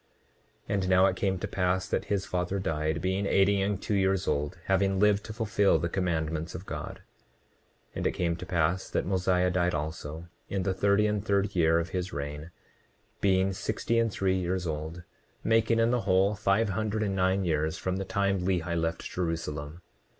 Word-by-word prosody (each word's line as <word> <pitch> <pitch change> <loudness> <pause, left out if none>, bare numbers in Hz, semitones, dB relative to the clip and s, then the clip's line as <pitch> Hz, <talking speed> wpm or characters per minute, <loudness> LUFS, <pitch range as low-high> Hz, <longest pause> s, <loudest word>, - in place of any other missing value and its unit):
29:45 - - -2
And 95 -2 0
now 95 0 +6
it - - +2
came 95 -2 0
to - - -4
pass 90 0 0
that - - -1
his 100 -2 -1
father 90 +2 -2
died, 80 -3 -1
being 95 +2 0
eighty 100 0 +3
and 100 0 0
two 105 - -3
years 95 -1 +1
old, 75 +2 -1
having 95 0 +2
lived 105 0 +3
to - - -7
fulfil 110 -2 +2
the 85 - -2
commandments 80 -3 -2
of 90 +2 -7
God. - - -6 0.9
29:46 - - -8
And - - 0
it - - +1
came 85 -1 0
to 90 +2 -8
pass 90 +1 0
that - - -1
Mosiah 90 -1 +1
died 90 -2 +1
also, 80 +1 -5 0.2
in 95 -2 -1
the 95 - 0
thirty 100 +2 +3
and 105 -1 0
third 100 -2 0
year 80 -1 +4
of 85 +2 -1
his 95 -1 -3
reign, 75 +3 -5 0.7
being 95 0 +2
sixty 115 +4 -1
and 115 -1 +1
three 95 -1 0
years 90 0 -2
old; 80 +2 -4 0.4
making 115 0 +3
in 115 +1 +3
the 125 -1 +1
whole, 95 0 +3
five 105 +1 +1
hundred 110 +2 -1
and 100 -2 -1
nine 95 +1 +1
years 80 0 0
from 95 0 -2
the 95 - -2
time 100 0 0
Lehi 90 -2 -1
left 80 0 -1
Jerusalem. 80 -2 -4
95 Hz, 195 wpm, -28 LUFS, 85-100 Hz, 0.9 s, now